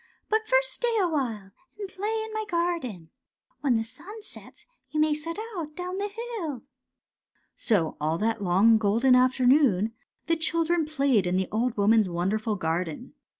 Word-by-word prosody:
But 435 0 +1
first - - +2
stay 475 -2 0
awhile 255 - -1 0.3
and 410 -2 -5
play 420 +4 -3
in 440 - -9
my 435 0 -2
garden. 330 - -2 0.5
When 265 -3 +2
the 225 - +1
sun 370 - -11
sets - - -12 0.2
you 305 - -2
may 305 0 +3
set 330 +4 -4 0.2
out 305 -4 -5
down 360 +1 -4
the 405 - -1 0.3
hill. 300 - -4 0.5
" - - -47
So 180 -8 +2
all 155 +2 0
that 225 +2 -1
long 200 +5 +4
golden 225 +5 +3
afternoon 250 -4 +4 0.3
the 330 0 +1
chil 330 +1 +1
dren 340 -1 +1
played 275 -10 +1
in 180 - 0
the 190 -1 -1
old 230 +2 0
woman's 210 0 +4
wonderful 210 +5 -1
garden. 175 - -3
255 Hz, 165 wpm, -26 LUFS, 210-340 Hz, 0.5 s, long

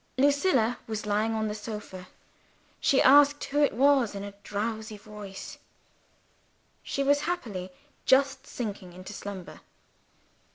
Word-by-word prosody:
Lucilla 275 -4 +3
was 220 -1 -4
lying 215 +2 +1
on 220 0 0
the 210 - -2
sofa. 210 -4 -7 0.7
She 270 - +3
asked 285 +2 +6
who 290 +1 0
it 285 - +3
was 265 -4 +4
in 200 - -5
a 205 - -6
drowsy 215 +1 -4
voice 205 -2 -9 1.2
she 275 - -2
was 285 +1 +4
happily 205 - -3 0.3
just 270 0 +3
sinking 200 -6 -5
into 185 +3 -9
slumber. 195 -3 -8
220 Hz, 125 wpm, -28 LUFS, 205-275 Hz, 1.2 s, asked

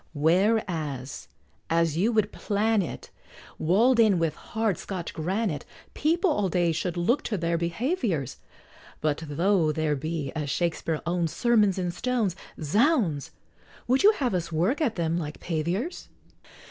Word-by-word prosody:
Whereas, 160 - 0 0.4
as 165 -2 +2
you 200 +8 +2
would 215 -2 +1
plan 215 +1 +1
it, 175 - -7 0.5
Wall'd 230 +10 +3
in 215 -5 +5
with 165 -3 0
hard 220 +2 -2
Scotch 185 -4 -5
granite, 180 -1 -1 0.3
People 340 +4 +2
all 205 -9 +1
day 175 -1 +2
should 175 +2 -2
look 230 +11 +2
to 210 - -2
their 170 -1 0
behaviors; 170 - -1 0.6
But 155 0 0
though 170 +2 +2
there 155 -1 0
be, 150 -1 -3
as 150 -2 -2
Shakspeare 165 -1 -1
owns, 170 -1 0
"Sermons 215 -6 +3
in 180 -2 -1
stones," 220 -1 -1 0.2
Zounds! 195 - +2 0.6
Would 260 +2 +3
you 420 +2 +7
have 260 - -1
us 170 -2 -2
work 185 - +1
at 250 -8 +1
them 170 -1 0
like 150 -2 -6
paviors? 175 - -3
175 Hz, 145 wpm, -26 LUFS, 160-220 Hz, 0.6 s, you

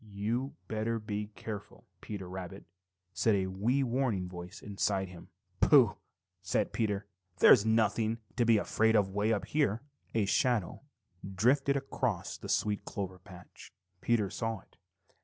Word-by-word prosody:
"You'd 110 +6 -3
better 110 +2 -1
be 105 -1 -4
careful, 105 -3 -8 0.2
Peter 100 -3 -6
Rabbit," 95 +1 -7 0.5
said 110 -2 +3
a 95 -1 +1
wee 110 +9 +1
warning 120 -7 0
voice 90 +3 -9
inside 100 -1 -1
him. 90 -2 -12 0.3
"Pooh!" - - +6 0.5
said - - 0
Peter. 105 -2 -1 0.3
"There's 110 -2 +7
nothing 110 0 +2 0.2
to 120 - +2
be 115 -1 +5
afraid 110 +2 +2
of 100 -3 +3
way 105 +3 0
up 105 -3 0
here!" 125 -6 0 0.3
A 110 -3 +3
shadow 110 -2 +1 0.5
drifted 135 +7 +3
across 130 -8 -2
the - - -8
sweet 105 -1 0
clover 95 -2 -5
patch. 90 -1 -14 0.3
Peter 110 -5 +1
saw 115 -3 -3
it. - - -28
105 Hz, 140 wpm, -31 LUFS, 95-115 Hz, 0.5 s, There's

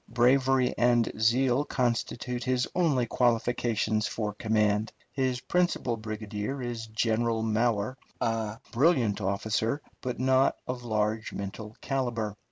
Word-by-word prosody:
Bravery 130 +1 +3
and 120 -1 +3
zeal 125 +4 +3
constitute 125 -1 -1
his 125 -1 +1
only 150 -9 +2
qualifications 115 -2 +1
for 105 -2 -3
command. 105 0 +1 0.2
His 130 -2 -1
principal 175 -9 0
brigadier 110 +3 -4
is 120 -3 -4
General 110 +1 0
Mower, 110 +2 0 0.2
a 110 -1 -1
brilliant 120 - +2
officer, 110 +6 0 0.2
but 125 -2 -4
not 130 +1 +3
of 125 -1 -3
large 110 -1 -1
mental 105 +2 -6
calibre. 120 -6 -2
115 Hz, 115 wpm, -28 LUFS, 110-125 Hz, 0.2 s, Bravery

